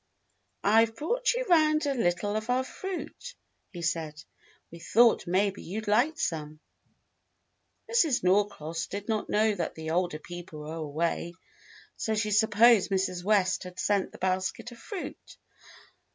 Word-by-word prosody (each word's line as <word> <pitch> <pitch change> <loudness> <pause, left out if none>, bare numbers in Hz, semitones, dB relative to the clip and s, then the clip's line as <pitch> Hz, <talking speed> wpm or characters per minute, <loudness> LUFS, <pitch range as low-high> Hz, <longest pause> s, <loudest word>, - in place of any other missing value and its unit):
"I've 225 +2 +4
brought 485 - 0
you - - -1
'round 310 -3 +4
a 280 - +1
little 205 -3 0
of 215 +2 -3
our 255 +1 +2
fruit," 385 - -7 0.4
he 175 -3 -7
said. 155 -2 -2 0.5
"We 170 - -10
thought 230 +5 +3
maybe 195 +3 +1
you'd 215 +4 -6
like 245 +10 +2
some." 155 -2 -3 1.3
Mrs. 330 - +2
Norcross 180 -4 0
did 205 0 -6
not 220 -2 -2
know 215 +1 +3
that 175 -5 -3
the 160 0 -5
older 175 -2 0
people 175 -1 -9
were 150 +1 -7
away, 165 +2 -2 0.6
so 220 - -1
she 215 0 -1
supposed 220 0 +5
Mrs. 190 -2 -1
West 195 -2 +2
had 180 0 -9
sent 200 -2 +1
the - - -12
basket 190 +5 -2
of 235 - -13
fruit. 395 - -8
205 Hz, 145 wpm, -28 LUFS, 175-235 Hz, 1.3 s, supposed